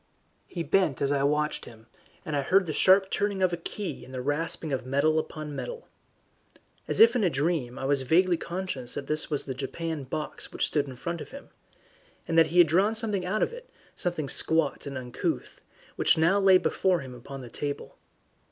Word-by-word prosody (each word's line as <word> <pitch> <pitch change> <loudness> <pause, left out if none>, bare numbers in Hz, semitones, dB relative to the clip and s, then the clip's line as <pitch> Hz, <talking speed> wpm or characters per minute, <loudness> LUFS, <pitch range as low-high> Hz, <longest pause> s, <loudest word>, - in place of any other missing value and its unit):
He 170 - -4
bent 175 -7 +1
as 140 0 0
I 140 -1 +1
watched 150 +2 0
him, 110 -1 -14 0.4
and 155 - -3
I 140 - +1
heard 190 +7 +3
the 155 - -3
sharp 190 +3 +4
turning 200 -2 0
of 180 -1 +2
a - - +2
key 185 +3 -6
and - - -13
the 130 -1 -4
rasping 150 +1 -2
of 130 -1 -2
metal 140 +5 +2
upon 155 -2 -6
metal. 485 - -6 1.0
As - - -1
if 230 +2 +7
in 240 - +2
a 185 - +4
dream 140 -4 -1
I 135 - -4
was 140 0 +2
vaguely 175 +7 +3
conscious 170 -9 -4
that 140 - -4
this 155 +2 +1
was 145 -2 +1
the 135 - -5
japanned 140 +1 -5
box 150 +2 -5
which - - 0
stood 145 -2 0
in 130 - -8
front 170 +6 -5
of - - -9
him, 280 +1 -11 0.8
and 165 - -1
that 165 -1 +6
he 170 +3 -3
had 175 - +9
drawn 190 +8 +2
something 210 -5 0
out 215 +4 +1
of - - -2
it, - - -11 0.3
something 175 -5 -3
squat 160 0 +2
and 140 -1 -5
uncouth, 125 -1 -4 0.4
which - - +3
now 170 +5 +3
lay 190 -1 +6
before 185 -1 +1
him 130 -2 -9
upon 135 +3 -9
the 120 -2 -10
table. 145 -1 -5
160 Hz, 205 wpm, -27 LUFS, 140-185 Hz, 1.0 s, had